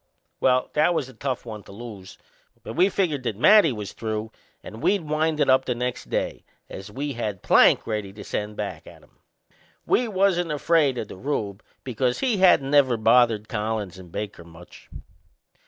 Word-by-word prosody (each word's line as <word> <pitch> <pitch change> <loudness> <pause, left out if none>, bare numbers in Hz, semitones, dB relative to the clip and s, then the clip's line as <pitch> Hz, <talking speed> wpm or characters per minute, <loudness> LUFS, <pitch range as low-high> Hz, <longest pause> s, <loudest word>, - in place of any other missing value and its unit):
Well, 130 -1 +2
that 155 +3 +2
was 135 - -1
a - - -13
tough 130 +1 -4
one 110 -3 -7
to - - -15
lose; 100 -3 -10 0.5
but - - -7
we 180 +5 +3
figured 170 -8 -1
that 120 -4 -3
Matty 205 - +6
was 105 -4 -6
through 110 0 -4 0.3
and 110 +2 -10
we'd 200 -3 +1
wind 155 +1 0
it - - +3
up 130 0 +4
the 125 - -1
next 125 +1 -4
day, - - -2 0.3
as 95 +2 -8
we 140 +6 -4
had 105 -5 -4
Plank - - +5
ready 105 -3 -3
to 105 0 -10
send 105 +1 -4
back - - -6
at - - -14
'em. - - -26 0.7
We 245 - +2
wasn't 185 -5 +1
afraid 150 -3 +2
o' - - -2
the 100 - -11
Rube, 105 -5 -3 0.2
because 125 0 -1
he 250 -5 +1
hadn't 175 -8 +4
never 135 -5 +4
bothered 115 -1 +3
Collins 105 -3 -3
and 90 -2 -13
Baker 100 -3 -6
much. 85 +1 -16
125 Hz, 185 wpm, -24 LUFS, 105-150 Hz, 0.7 s, Matty